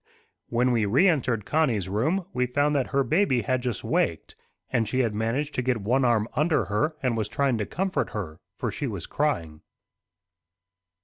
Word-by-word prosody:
When 125 +2 +2
we 115 -4 +2
reentered 125 - +2
Connie's 125 - +1
room, 155 - 0
we 125 0 +1
found 145 +4 +1
that 135 -3 +1
her 140 0 +1
baby 155 - +2
had 130 +3 0
just 120 -5 -3
waked, - - -1 0.4
and 115 -4 +1
she 130 +4 +1
had 115 -4 0
managed 115 +8 -1
to - - 0
get 125 -1 0
one 120 +6 +1
arm 115 -3 +2
under 150 - +2
her, 105 - 0
and 125 -3 +1
was 110 -2 -2
trying 135 -5 +1
to 105 - -2
comfort 190 +2 -1
her, 85 -8 -6 0.2
for - - -2
she - - -3
was - - -4
crying. 80 -2 -2
125 Hz, 180 wpm, -26 LUFS, 110-145 Hz, 0.4 s, When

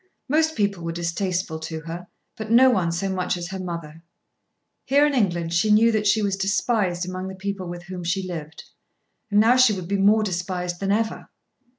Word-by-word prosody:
Most 315 +3 +2
people 200 -5 -1
were 165 - -3
distasteful 170 0 -2
to 160 0 -6
her, 170 +2 -7 0.3
but 220 -1 -7
no 255 +3 +6
one 175 -7 +1
so 175 +4 -2
much 185 -1 -1
as 175 0 -6
her 190 0 -5
mother. 170 -3 -6 0.8
Here 285 +2 +4
in 295 - +1
England 175 -9 0
she 175 +6 +2
knew 220 +2 +5
that 215 -1 0
she 215 +1 +3
was 200 -1 0
despised 195 -2 0
among 185 +1 -5
the 190 - -7
people 195 -1 -4
with 175 0 -7
whom 180 0 -7
she 185 +2 -1
lived. 160 -3 -7 0.7
And 205 -1 +3
now 235 +4 +5
she 255 -4 +6
would 185 -3 -5
be 200 +1 0
more 210 +3 +4
despised 180 -2 -3
than 195 0 -1
ever. 220 +1 -1
190 Hz, 200 wpm, -23 LUFS, 175-210 Hz, 0.8 s, no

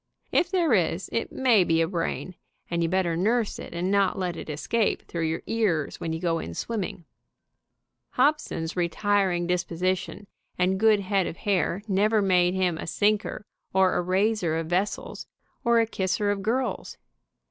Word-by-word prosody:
If 355 - +2
there 345 -7 +2
is, 180 -1 +1
it 230 - -1
may 240 -7 +4
be 165 -1 +2
brain, 175 +1 -3 0.4
and 170 0 0
you 165 - +1
better 180 -2 +1
nurse 220 +5 0
it - - -8
and 175 +3 -2
not 200 -2 +2
let 180 -3 -2
it 165 - -8
escape 205 +9 0
through 165 -1 -3
your 160 +1 -3
ears 195 -10 0
when 165 - -3
you 160 - -3
go 165 -1 0
in 85 - -6
swim 230 -2 -3
ming. 180 -3 -5 1.1
Hobson's 255 - 0
retiring 180 0 +1
disposition 180 +2 -2 0.3
and 185 +1 +1
good 215 -1 +4
head 195 -2 0
of 165 - -6
hair 200 -2 0
never 210 +2 +2
made 180 -2 +3
him 180 -3 0
a - - -6
sinker 210 +3 0 0.3
or 190 -1 +4
a - - +1
raiser 185 -2 +1
of 165 - -2
vessels, 180 +5 -2 0.4
or 235 -1 +4
a 230 - +3
kisser 205 -1 -1
of 200 -1 -2
girls. 245 +6 -2
190 Hz, 170 wpm, -26 LUFS, 170-210 Hz, 1.1 s, may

